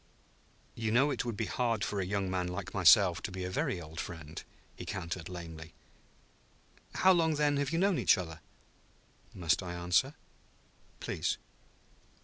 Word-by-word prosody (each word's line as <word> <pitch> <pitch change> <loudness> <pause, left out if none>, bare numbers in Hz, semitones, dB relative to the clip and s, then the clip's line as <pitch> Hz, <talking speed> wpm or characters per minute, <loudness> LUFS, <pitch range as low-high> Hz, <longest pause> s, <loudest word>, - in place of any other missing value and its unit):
"You 110 -1 -2
know 135 +6 +4
it 135 - -2
would 115 -3 -3
be 110 - -1
hard 115 -2 0
for 100 -2 -1
a - - -2
young 100 -1 -1
man 90 -1 -1
like 95 +1 -5
myself 95 -1 +6
to 105 - -4
be 95 0 -5
a 90 - -3
very 95 - -1
old 80 0 -9
friend," 80 -2 -6 0.3
he - - -8
countered 85 +1 -5
lamely. 80 -2 -8 1.2
"How 190 - +5
long, 165 -3 +2
then, 145 -1 +2
have 140 -1 0
you 165 - -1
known 190 0 +2
each - - +5
other?" 80 -3 -6 1.0
"Must 85 -1 +1
I 90 -2 -5
answer?" 90 - +1 0.9
"Please." - - -1
95 Hz, 160 wpm, -32 LUFS, 85-120 Hz, 1.2 s, myself